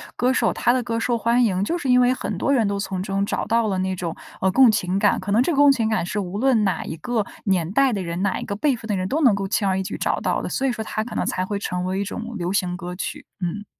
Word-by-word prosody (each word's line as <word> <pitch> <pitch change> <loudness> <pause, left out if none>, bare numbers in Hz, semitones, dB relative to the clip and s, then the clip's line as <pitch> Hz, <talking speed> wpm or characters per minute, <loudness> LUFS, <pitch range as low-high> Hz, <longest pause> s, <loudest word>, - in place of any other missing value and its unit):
歌 250 +1 +2
手， 235 -3 +1
他 240 - +2
的 255 0 +1
歌 230 -1 -2
受 235 +1 0
欢 235 +2 +2
迎， 190 -4 +1
就 345 - -1
是 275 -6 -3
因 250 0 +6
为 250 +1 +4
很 - - -4
多 280 - 0
人 230 -5 +3
都 200 0 -1
从 190 -2 -3
中 195 0 -1
找 - - -2
到 230 0 +1
了 190 -2 -1
那 190 0 -1
种， 170 -2 -4 0.2
呃， 190 - +2
共 260 -1 +6
情 185 -3 0
感， 205 0 +3
可 200 +2 -3
能 235 +4 +4
这 345 - 0
个 285 - -1
共 285 0 +7
情 230 -5 +2
感 220 -6 0
是 210 - -4
无 195 0 -3
论 250 -3 +3
哪 195 -2 -1
一 - - -5
个 220 +5 -1 0.2
年 180 -5 +1
代 270 +6 +3
的 200 -4 -2
人， 170 +1 -4
哪 200 -1 0
一 - - -6
个 200 - -3
辈 280 +5 +1
分 220 - -10
的 205 - 0
人 185 0 -2
都 295 - 0
能 245 -8 +5
够 200 -1 -3
轻 205 -1 +1
而 190 0 +1
易 190 - -1
举 205 - -5
找 - - -1
到 - - 0
的， - - -4
所 270 - -1
以 260 - +2
说 230 -2 -4
它 215 0 -2
可 225 - -8
能 - - -1
才 185 0 -1
会 200 0 -3
成 180 -3 -3
为 185 +1 -2
一 200 - -1
种 230 +2 -6
流 175 +1 -2
行 180 -3 0
歌 180 0 -6
曲， - - -5 0.2
嗯。 205 +4 -3
205 Hz, 340 characters per minute, -22 LUFS, 190-240 Hz, 0.2 s, 共